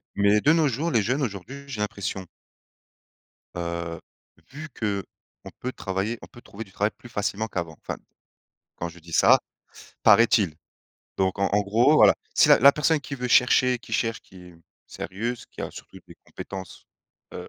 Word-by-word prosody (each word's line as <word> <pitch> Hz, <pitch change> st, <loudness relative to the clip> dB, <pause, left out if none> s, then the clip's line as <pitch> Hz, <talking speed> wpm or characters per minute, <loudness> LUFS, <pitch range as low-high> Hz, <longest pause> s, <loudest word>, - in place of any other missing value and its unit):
mais 100 Hz, +1 st, +4 dB
de 150 Hz, -, +5 dB
nos 160 Hz, -2 st, +3 dB
jours, 145 Hz, +7 st, -2 dB
les 115 Hz, -, +3 dB
jeunes 125 Hz, +8 st, -1 dB
aujourd'hui, 125 Hz, +4 st, -5 dB
j'ai 125 Hz, -7 st, -5 dB
l'impression 95 Hz, -2 st, -4 dB, 1.3 s
heu, 85 Hz, -1 st, -4 dB, 0.5 s
vu 155 Hz, +3 st, -9 dB
qu'on 100 Hz, -3 st, -6 dB
peut 125 Hz, -, -3 dB
travailler 95 Hz, +2 st, -3 dB
on -, -, -11 dB
peut 120 Hz, -, -16 dB
trouver 110 Hz, -1 st, -9 dB
du 100 Hz, -, -20 dB
travail 105 Hz, +3 st, 0 dB
plus 120 Hz, -, -14 dB
facilement 105 Hz, -1 st, -2 dB
qu'avant. 85 Hz, -6 st, -5 dB
Enfin, -, -, -5 dB, 0.8 s
quand 85 Hz, -, -4 dB
je 85 Hz, +1 st, -14 dB
dis 85 Hz, 0 st, -13 dB
ça -, -, +6 dB, 0.6 s
paraît-il. 105 Hz, -8 st, +5 dB, 0.6 s
Donc, 95 Hz, 0 st, 0 dB
en 100 Hz, -, +2 dB
en 105 Hz, -, +4 dB
gros 115 Hz, +9 st, +3 dB
voilà, -, -, +7 dB, 0.2 s
si -, -, +5 dB
la -, -, +7 dB
la 140 Hz, +3 st, +8 dB
personne 150 Hz, +1 st, +1 dB
qui 140 Hz, +1 st, -7 dB
veut 125 Hz, -2 st, -4 dB
chercher 125 Hz, 0 st, +4 dB
qui -, -, -15 dB
cherche, 115 Hz, -1 st, 0 dB
qui 95 Hz, -, -19 dB
est 90 Hz, -1 st, -13 dB, 0.3 s
sérieuse, 115 Hz, +5 st, -5 dB
qui -, -, -11 dB
a -, -, -4 dB
surtout -, -, -12 dB
des -, -, -14 dB
compétences, 95 Hz, -3 st, -9 dB, 0.5 s
heu, -, -, -7 dB
105 Hz, 175 wpm, -25 LUFS, 95-125 Hz, 1.3 s, la